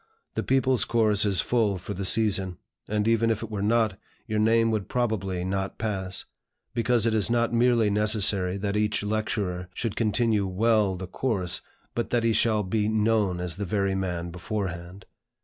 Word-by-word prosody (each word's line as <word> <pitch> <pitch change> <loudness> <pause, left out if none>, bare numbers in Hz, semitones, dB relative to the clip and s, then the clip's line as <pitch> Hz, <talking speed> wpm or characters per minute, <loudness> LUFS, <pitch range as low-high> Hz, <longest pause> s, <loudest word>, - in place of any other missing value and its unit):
The - - -1
People's 130 -1 +2
Course 110 -3 +2
is 95 -2 +3
full 110 -5 +1
for 90 +3 -6
the 100 0 -4
season; 95 -3 +1 0.3
and 105 +1 0
even 115 0 +3
if 110 -1 -1
it - - -7
were 105 -2 -3
not, 110 -1 +1 0.3
your 110 -3 -1
name 115 +1 +3
would 105 -3 -2
probably 100 -7 -1
not 95 +1 -2
pass; 95 -4 -3 0.5
because 120 -1 +1
it 115 - +2
is 110 -1 0
not 120 0 +1
merely 115 -3 +3
necessary 100 -3 +2
that 100 0 -2
each 105 0 +1
lecturer 105 -4 -2
should 115 -3 -2
continue 110 -2 +1
well 105 0 +2
the 90 +1 -6
course, 95 -3 -1 0.3
but 115 - -2
that 120 -1 +1
he 115 -1 +2
shall 110 -2 +2
be 105 +2 0
known 105 -4 +1
as 90 -1 -3
the 100 - -3
very 100 +1 0
man 90 -3 -3
beforehand. 90 0 -5
105 Hz, 175 wpm, -26 LUFS, 95-115 Hz, 0.5 s, is